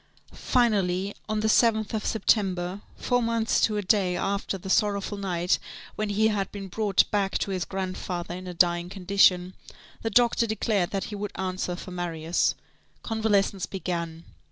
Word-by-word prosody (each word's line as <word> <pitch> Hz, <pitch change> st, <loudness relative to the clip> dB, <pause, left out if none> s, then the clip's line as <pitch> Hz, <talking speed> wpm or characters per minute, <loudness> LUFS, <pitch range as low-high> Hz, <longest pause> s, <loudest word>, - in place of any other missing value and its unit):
Finally, 200 Hz, -5 st, +1 dB, 0.2 s
on 215 Hz, 0 st, 0 dB
the 220 Hz, -, +1 dB
7th 220 Hz, -1 st, +3 dB
of 215 Hz, -, -1 dB
September, 190 Hz, -3 st, +1 dB, 0.2 s
four 245 Hz, -1 st, +1 dB
months 230 Hz, -1 st, +1 dB
to 215 Hz, -1 st, +2 dB
a 205 Hz, -, -1 dB
day, 185 Hz, -2 st, +2 dB
after 200 Hz, +1 st, -1 dB
the 190 Hz, -, -10 dB
sorrowful 200 Hz, +1 st, +1 dB
night 180 Hz, -3 st, 0 dB, 0.4 s
when 215 Hz, -1 st, -2 dB
he 215 Hz, +2 st, +3 dB
had 200 Hz, -2 st, -1 dB
been 200 Hz, -1 st, -7 dB
brought 200 Hz, +1 st, +2 dB
back 200 Hz, -2 st, +1 dB
to 200 Hz, -, -2 dB
his 185 Hz, -2 st, -1 dB
grandfather 185 Hz, -2 st, -4 dB
in 185 Hz, +1 st, -7 dB
a 180 Hz, -, -5 dB
dying 175 Hz, 0 st, +2 dB
condition, 185 Hz, -1 st, +3 dB, 0.5 s
the 225 Hz, -, -1 dB
doctor 235 Hz, +1 st, +3 dB
declared 215 Hz, -4 st, 0 dB
that 195 Hz, -2 st, -2 dB
he -, -, -3 dB
would 205 Hz, 0 st, -4 dB
answer 185 Hz, -1 st, -2 dB
for 185 Hz, -, -9 dB
Marius. 170 Hz, -2 st, 0 dB, 0.5 s
Convalescence 210 Hz, -4 st, +1 dB
began. 170 Hz, -3 st, -4 dB
195 Hz, 160 wpm, -26 LUFS, 180-215 Hz, 0.5 s, 7th